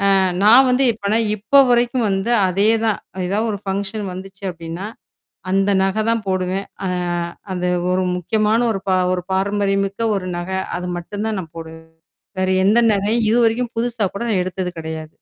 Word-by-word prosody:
அ - - +4 0.3
நான் 250 +5 +7
வந்து 250 +2 +3
எப்பனா 210 +1 -1 0.2
இப்போ 215 +7 +2
வரைக்கும் 240 0 +2
வந்து 195 +5 -1 0.2
அதே 195 +4 +1 0.2
தான் 215 -3 +1 0.3
ஏதாவது 215 +4 0
ஒரு 205 - -3
ஃபங்ஷன் 200 +2 -2
வந்துச்சு 190 +1 -10
அப்ப்டின்னா. 170 +3 -7 0.7
அந்த 195 +1 +2
நகை 195 +3 0
தான் 230 -2 -1
போடுவேன். 185 +1 -1 0.2
அ - - 0 0.7
அது 180 0 -1 0.2
ஒரு 185 - +1
முக்கியமான 215 +5 +1
ஒரு 195 - -4
ப - - +2 0.2
ஒரு 180 - -1
பாரம்பரியமிக்க 195 +1 0
ஒரு 185 -2 -4
நகை. 185 +2 -3 0.2
அது 180 - -5
மட்டும் 205 +5 -5
தான் 215 - -2
நான் 160 -3 -11
போடுவேன். 160 0 -10 0.5
வேற 185 - +1 0.2
எந்த 215 +4 +4
நரையும் 210 +3 +1
இதுவரைக்கும் 235 +1 +2
புதுசா 235 -2 -1
கூட 235 - -3
நான் 185 -4 +2
எடுத்தது 185 0 -4
கிடையாது. 160 -1 -6
195 Hz, 165 wpm, -19 LUFS, 185-220 Hz, 0.7 s, நான்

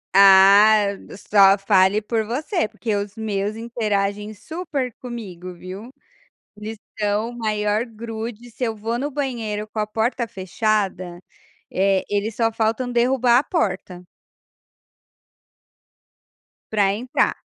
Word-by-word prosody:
Ah, 200 +2 +7 0.3
só 195 -1 +5
fale 195 0 +3
por 220 +1 -1
você, 290 - -2
porque 220 -2 -3
os 200 +1 -4
meus 210 -1 -2
interagem 210 -3 -2
super 295 - -4
comigo, 185 -8 -8
viu. 190 +8 -9 0.6
Eles 215 +1 -7 0.2
são 210 +2 0
o 240 - -11
maior 215 0 0
grude, 225 +1 -7
se 250 - -7
eu 225 -2 0
vou 225 +2 -3
no 285 +3 -3
banheiro 230 -7 -3
com 215 - -6
a 210 - 0
porta 230 +3 -1
fechada, 190 -2 -2 0.5
eh, 195 0 +1
eles 205 +2 -1
só 225 -1 +1
faltam 225 +3 0
derrubar 245 0 +3
a - - -2
porta 185 - -2 2.7
para 200 -2 +2
entrar. 245 +4 0
215 Hz, 120 wpm, -22 LUFS, 200-235 Hz, 2.7 s, Ah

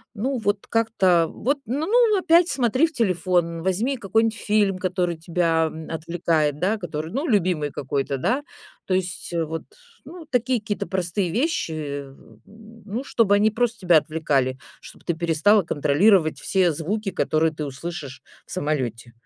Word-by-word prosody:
Ну, 255 +5 -1
вот 205 -2 -1
как-то 190 -7 +2
вот, 275 +5 -1
ну 280 +7 -2
ну, 455 -1 +4
опять 350 -1 +4
смотри 260 +3 +2
в 315 - -13
телефон, 175 - 0
возьми 220 +9 0
какой-нибудь 225 +2 +1
фильм, 205 -2 +1
который 180 -2 -1
тебя, 165 -1 +1
м, 160 0 -6
отвлекает, 160 -2 0
да, 200 +6 +1
который, 160 -4 -5
ну, 280 +8 -2
любимый 180 - +1
какой-то, 140 +1 -2
да. 245 - 0 0.4
То 190 - -1
есть 180 -1 -2
вот, 165 -1 -2 0.4
ну, 330 +3 -10
такие 250 -2 0
какие-то 205 -1 -3
простые 185 0 -1
вещи, 160 - -2 0.4
ну, 220 +2 -8
чтобы 220 -6 +2
они 215 +2 +3
просто 235 +1 -1
тебя 175 -4 +5
отвлекали, 145 -5 0 0.2
чтоб - - -14
ты 170 - -1
перестала 170 +5 +3
контролировать 155 +3 +3
все 185 -3 +2
звуки, 195 +7 -3
которые 160 +1 +1
ты 150 -1 -4
услышишь 140 -1 -7 0.2
в - - -16
самолете. 130 - -2
185 Hz, 150 wpm, -23 LUFS, 160-225 Hz, 0.4 s, тебя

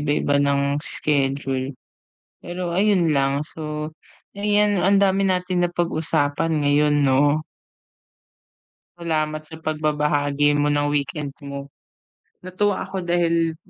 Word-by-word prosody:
iba-iba 145 -1 +1
ng 140 0 +1
schedule. 135 -4 -1 0.6
Pero 175 0 -5
ayun 185 -2 +2
lang. 140 0 +1
So, 150 0 -6 0.4
ayan, 205 0 +2
ang 195 +3 +3
dami 195 0 +3
natin 180 -1 0
na 175 - +1
pag-usapan 160 -2 0
ngayon, 145 +1 +3
'no? 145 +3 +3 1.6
Salamat 155 -2 -2
sa 160 +1 -11
pagbabahagi 150 -2 +1
mo 145 0 +2
ng 145 0 +1
weekend 145 0 -2
mo. 140 0 -7 0.7
Natuwa 195 +2 -1
ako 190 -1 -5
dahil 170 -2 +1
155 Hz, 110 wpm, -22 LUFS, 145-175 Hz, 1.6 s, ang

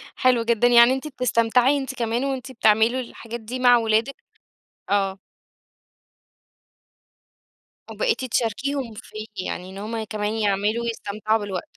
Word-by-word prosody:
حلو 250 -2 +3
جدًا، 235 +1 +2
يعني 240 +1 +7
أنتِ 265 +3 -4
بتستمتعي 250 0 +2
أنتِ 265 -1 -4
كمان 235 +2 -1
وأنتِ 265 -1 -4
بتعملوا 225 +1 +3
الحاجات 235 -1 -7
دي 240 +4 -6
مع 245 -1 +6
ولادِك؟ 225 +3 +1 0.8
آه. 195 -1 +1 2.7
وبقيتِ 455 - -1
تشاركيهم 250 +1 -2
فيه، 215 0 -9 0.2
يعني 180 +1 -5
إن 195 - -10
هُم 220 +2 -4
كمان 210 -1 -3
يعملوا 210 +2 0
ويستمتعوا 215 -1 -1
بالوقت. 200 -3 -6
230 Hz, 120 wpm, -23 LUFS, 215-255 Hz, 2.7 s, يعني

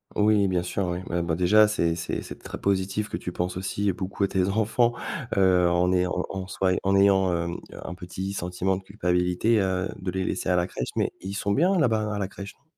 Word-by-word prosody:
Oui 105 -1 +4
bien 90 -2 +1
sûr 95 +1 -2
oui. 90 0 -2
Bah, 85 -1 -1
bon, 85 -1 -1
déjà 105 +5 +5
c'est 85 -6 0
c'est 85 - -3
c'est - - -8
très - - -8
positif 100 +2 0
que - - -3
tu 90 - -5
penses 90 +1 -3
aussi 95 +2 -1
beaucoup 95 +2 -3
à - - +3
tes 95 -1 +1
enfants, 110 +3 +2 0.4
heu, 90 -2 +4
en 90 +1 +2
ayant 90 -1 +1 0.2
en 95 -1 -4
en - - -11
soi, 95 -1 0
heu, - - 0
en 95 0 +2
ayant, 95 -2 +4
hem, 85 0 -2
un 90 - -7
petit 95 +2 -5
sentiment 90 +1 -1
de 95 - -10
culpabilité, 90 +3 +1
heu, 95 -1 0
de 95 -1 -4
les 95 0 -2
laisser 90 - -2
à 90 - +3
la 90 +1 +1
crèche, 60 - -4
mais - - 0
ils 95 +2 -5
sont 100 0 -1
bien, 180 - +3
là-bas 110 -6 +1
à 100 - -3
la 95 - -1
crèche, 100 0 -9
non? - - -37
95 Hz, 240 wpm, -26 LUFS, 90-100 Hz, 0.4 s, déjà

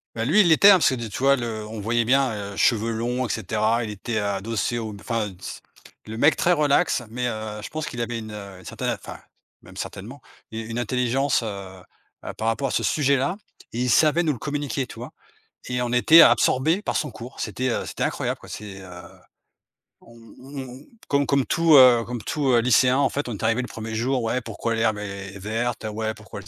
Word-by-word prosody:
Ben 115 0 -2
lui, 210 +6 +6
il 180 - +3
l'était, 195 +6 +7
hein, - - +10
parce 175 - +4
que 130 - -1
de 120 -2 -5
tu 100 - -7
vois? 140 0 +5
Le 115 -4 -4
on 110 0 -7
voyait 115 +2 0
bien, 135 0 +3 0.2
heu, - - -10
cheveux 115 +1 +2
longs 120 +3 -2
et - - -6
cetera. 110 +3 0
Il 110 - -5
était 110 +2 -3
adossé 105 +4 -2
au 110 -2 -4
m 100 - -9
enfin 115 -4 -2
s - - -8 0.4
le 110 +1 -7
mec 150 +5 +4
très 175 - +2
relax, 150 -3 +2
mais 125 +2 -3
heu, 110 -2 -5
je - - -6
pense 155 0 -4
qu'il 120 - -6
avait 115 0 -3
une, 110 -1 -8
heu, 100 -3 -9
certaine - - -3
enfin, - - -7 0.5
même - - -15
certainement 120 +9 -7 0.3
u 110 - -5
une 115 +1 -5
intelligence, 125 +2 0
heu, 100 -4 -7 0.4
bah, - - -7
par 110 - -3
rapport 135 +5 0
à - - -4
ce - - 0
sujet-là 140 +4 +1 0.3
et 120 - -3
il 125 - 0
savait 155 +5 +4
nous 155 -4 +1
le - - -7
communiquer, 145 -2 -3
tu - - -12
vois? - - -8 0.6
Et 125 0 -1
on 120 0 -2
était 160 +7 +7
absorbé 145 - +3
par - - -2
son 150 -6 -2
cours. 125 +4 -10
C'était, 130 0 -2
heu, - - -2
c'était - - -5
incroyable - - -2
quoi - - -14
c'est, 100 -2 -8
heu, 90 -1 -11 1.0
on 115 0 -17 0.2
on 135 -1 -9 0.2
comme 140 -1 +1
comme 140 -2 +2
tout, 165 -2 +4
heu, 125 -3 +7
comme 120 -2 -6
tout, 145 -3 -2
heu, 120 - +5
lycéen 125 +2 +4
en 140 - +3
fait, 145 -3 -3
on - - -3
est - - -9
arrivé 115 +3 +2
le 125 - -5
1er 110 0 -7
jour: 125 +2 0
«Ouais 125 +3 -1
pourquoi 115 +1 -4
l'herbe 110 -2 +1
est 100 -1 -7
verte? 115 +4 -3
Ouais 110 0 -3
pourquoi 110 -1 -10
le 100 - -13
120 Hz, 225 wpm, -23 LUFS, 110-135 Hz, 1.0 s, hein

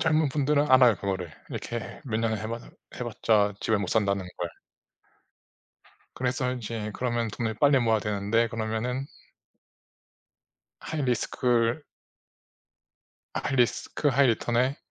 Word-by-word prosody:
젊은 155 -1 +3
분들은 145 +1 +2
알아요 125 -4 +7
그거를. 95 -4 -3 0.2
이렇게 120 -1 -5
몇 115 -5 -2
년을 110 -1 0
해 110 - -4
봐 115 +1 -3 0.4
해 125 - -4
봤자 105 -3 +2
집을 110 -2 +1
못 100 -3 -3
산다는 100 -3 +1
걸. 85 - -2 1.7
그래서 125 0 -1
이제 115 -3 -4
그러면 120 -2 -1
돈을 110 +1 -3
빨리 140 +4 +4
모아야 115 -3 +3
되는데. 105 +3 +1
그러면은 115 +4 -2 1.7
하이 155 -2 -3
리스크를 120 +1 +1 1.5
하이 - - -2
리스크 125 +4 +1
하이 140 0 +4
리턴에 120 +3 +1
115 Hz, 270 characters per minute, -27 LUFS, 110-130 Hz, 1.7 s, 알아요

